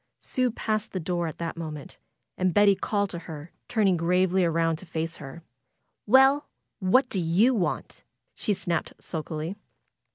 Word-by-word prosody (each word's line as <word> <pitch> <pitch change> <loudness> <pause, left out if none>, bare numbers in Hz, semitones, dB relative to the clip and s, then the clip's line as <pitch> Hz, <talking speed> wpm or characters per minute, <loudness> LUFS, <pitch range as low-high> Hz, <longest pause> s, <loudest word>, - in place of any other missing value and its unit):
Sue 255 -1 0
passed 215 -2 -2
the 185 - -1
door 175 0 -1
at 160 - -6
that 170 - -4
moment. 155 -3 -7 0.4
And 185 -2 0
Betty 205 -1 +6
called 200 +1 -1
to 170 - -5
her, 160 -1 -9 0.2
turning 205 -6 +3
gravely 180 +2 +2
around 165 -1 +1
to 185 - -10
face 165 0 -3
her. 150 +4 -10 0.6
"Well! 270 +5 +5 0.3
What 250 +8 +4
do 195 - -2
you 180 +10 +3
want?" 190 -7 -2 0.3
she 205 - -1
snapped 170 -2 -2
sulkily. 160 +3 -5
180 Hz, 155 wpm, -27 LUFS, 165-205 Hz, 0.6 s, Betty